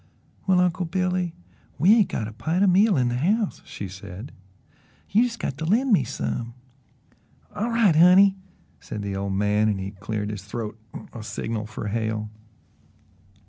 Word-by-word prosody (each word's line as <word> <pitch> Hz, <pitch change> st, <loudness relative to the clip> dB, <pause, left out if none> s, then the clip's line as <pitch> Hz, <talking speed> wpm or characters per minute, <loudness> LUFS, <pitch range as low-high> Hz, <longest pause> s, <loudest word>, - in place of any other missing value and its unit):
"Well, 185 Hz, -1 st, +4 dB
Uncle 180 Hz, -1 st, +1 dB
Billy, 180 Hz, -1 st, -1 dB, 0.4 s
we 185 Hz, +8 st, +6 dB
ain't 220 Hz, -4 st, +4 dB
got 110 Hz, -, -3 dB
a 110 Hz, -, -8 dB
pint 160 Hz, -, 0 dB
o' -, -, +5 dB
meal 195 Hz, +1 st, +4 dB
in 125 Hz, -2 st, +2 dB
the 120 Hz, -, -1 dB
house," 200 Hz, -, 0 dB
she 100 Hz, -, -6 dB
said. 100 Hz, +5 st, -9 dB, 0.8 s
"You 215 Hz, -, +5 dB
jes' 240 Hz, -1 st, 0 dB
got 135 Hz, -, -4 dB
to 160 Hz, -, -2 dB
LEND 235 Hz, +8 st, +3 dB
me 195 Hz, -, +4 dB
some." 120 Hz, -1 st, -4 dB, 1.0 s
"All 210 Hz, +3 st, -2 dB
right, 230 Hz, -8 st, +3 dB
honey," 185 Hz, +4 st, +7 dB, 0.4 s
said 105 Hz, -2 st, -6 dB
the 100 Hz, -1 st, -3 dB
old 100 Hz, 0 st, -2 dB
man, 105 Hz, +2 st, +2 dB
and 100 Hz, -2 st, -1 dB
he 95 Hz, +1 st, -4 dB
cleared 105 Hz, +1 st, -4 dB
his 105 Hz, -3 st, -6 dB
throat 105 Hz, +1 st, -5 dB, 0.2 s
as -, -, -7 dB
a 115 Hz, -, -7 dB
signal 110 Hz, 0 st, -4 dB
for 110 Hz, -1 st, -5 dB
Hale. 110 Hz, 0 st, -2 dB
125 Hz, 175 wpm, -24 LUFS, -, 1.0 s, honey